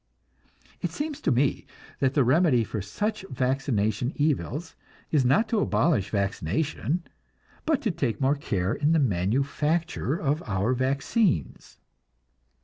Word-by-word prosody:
It - - -1
seems 295 -1 -4
to - - +1
me 130 +3 +1 0.3
that 135 0 +1
the 140 - +5
remedy 130 -1 +4
for 110 -1 -4
such 205 - -3
vaccination 125 -3 0
evils 150 +1 -1 0.4
is 150 -4 +3
not 140 - +3
to 225 - +1
abolish 150 - +1
vaccination, 110 - -1 0.6
but 310 -4 +1
to 220 - +1
take 125 - -2
more 135 +1 +3
care 100 -9 -1
in 150 +2 +1
the - - +4
manufacture 140 - 0
of 150 0 0
our 100 +4 +1
vaccines. 135 - 0
135 Hz, 130 wpm, -26 LUFS, 115-160 Hz, 0.6 s, the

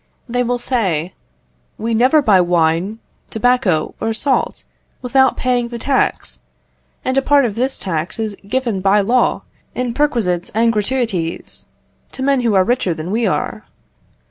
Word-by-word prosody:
They 245 +1 -1
will 245 0 0
say 190 - -1 0.6
"We 230 +1 -2
never 255 +7 +4
buy 200 -6 +5
wine, 175 +3 +1 0.3
tobacco, 225 -8 +1
or 225 0 -1
salt, 265 +4 -1 0.4
without 265 +1 +3
paying 245 -2 0
the 235 0 -6
tax, 265 +3 -1 0.7
and 260 +1 +2
a - - -1
part 280 0 +3
of 220 - -2
this 255 +5 -1
tax 170 -3 -3
is 220 -2 -3
given 235 -4 -1
by 200 +2 +4
law 245 +6 +1 0.3
in 250 -1 -2
perquisites 225 -11 0
and 230 +1 +3
gratuities 210 -6 -2 0.5
to 260 - -5
men 275 -1 +2
who 230 -4 +1
are 190 - +5
richer 195 -6 0
than 160 +3 -5
we 230 +2 +1
are. - - -2
230 Hz, 150 wpm, -18 LUFS, 190-255 Hz, 0.7 s, buy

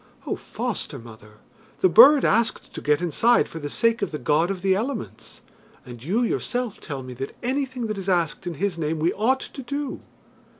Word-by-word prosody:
"Oh, - - -2
foster - - -5
mother, 110 -2 -14 0.4
the - - +6
bird 270 - +8
asked 230 +2 +1
to - - -6
get 150 +3 +1
inside 225 +9 +3
for 165 - -8
the 145 -1 -5
sake 230 +7 +1
of 200 - 0
the 150 - -4
God 150 +6 +1
of 190 -2 -4
the 190 -1 +3
Elements, 225 +3 -5 0.4
and 120 -2 -10
you 205 - +1
yourself 245 -1 -2
tell 140 -4 -6
me 130 0 -8
that 135 +2 -6
anything 260 -1 -2
that 215 -2 -3
is 195 0 -4
asked 175 -2 0
in 170 - -3
His 185 +1 -2
name 160 0 -1
we 165 +3 +1
ought 260 +6 +1
to 275 - -8
do. 280 +2 -4
190 Hz, 200 wpm, -24 LUFS, 150-240 Hz, 0.4 s, bird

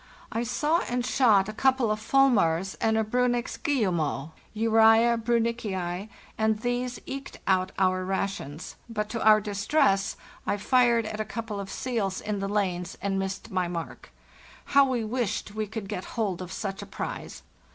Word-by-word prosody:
I 230 - -1
saw 295 +8 +1
and 245 0 -1
shot 220 -7 +4
a 215 - -5
couple 260 -1 +2
of 215 - -1
fulmars 195 -9 +3
and 220 0 +2
a 220 - +2
Briinnich's 245 +2 0
guillemot 175 - 0 0.2
(Urza 225 +1 +5
briinnichi:), 220 -5 -1 0.3
and 220 -1 +2
these 245 +1 -2
eked 275 0 -7
out 185 -1 +2
our 185 -1 +2
rations; 190 -5 -4
but, 210 -2 -3
to 230 0 -3
our 215 0 +7
distress, 205 +1 +1 0.3
I 205 - +1
fired 235 +1 +3
ata 215 0 -3
couple 215 -1 -5
of 195 -1 -6
seals 215 -7 -2
in 210 -1 -3
the 195 0 -2
lanes 180 -4 -1
and 195 -1 -1
missed 190 0 -4
my 185 -2 0
mark. 170 -1 -6 0.5
How 280 0 +5
we 255 -3 -1
wished 215 -3 -2
we 215 0 -2
could 220 -1 -6
get 195 -2 -4
hold 195 -6 -1
of 185 0 -7
such 195 0 -4
a - - -8
prize! - - -6
215 Hz, 160 wpm, -27 LUFS, 195-240 Hz, 0.5 s, our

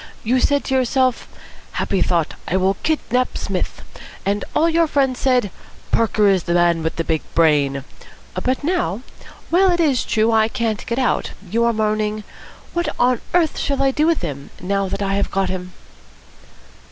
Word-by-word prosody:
You 250 +4 +2
said 285 +2 +2
to 265 - -3
yourself, 260 -1 +1 0.5
'Happy 195 - -1
thought, 170 -3 +1
I 185 - +1
will 190 +1 +2
kidnap 255 -5 0
Psmith!' - - -4 0.4
and 200 +1 0
all 320 - +4
your 335 0 +3
friends 270 -4 +1
said, 250 -7 +2 0.4
'Parker 215 -2 +3
is 190 -3 +2
the 170 - 0
man 170 -1 +3
with 160 0 -2
the 165 - -1
big 160 -1 0
brain!' 145 -4 +3 0.6
But 260 +2 0
now, 255 - -1 0.5
while 375 +3 +5
it 350 -1 +1
is 290 -7 +2
true 220 +1 +1
that - - +2
I 220 0 +4
can't 225 -2 -2
get 235 - -2
out, 255 -3 0 0.2
you 230 +1 +2
are 235 - +3
moaning, 215 -1 -1 0.5
'What 345 0 0
on 245 -1 +2
earth 335 -3 +2
shall 275 -1 0
I 270 - +3
do 300 +4 +1
with 330 - +1
him, 140 -4 -5
now 195 +1 -1
that 200 - -3
I 195 0 0
have 200 0 0
got 195 0 0
him?'" 180 -1 -5
220 Hz, 180 wpm, -20 LUFS, 190-265 Hz, 0.6 s, while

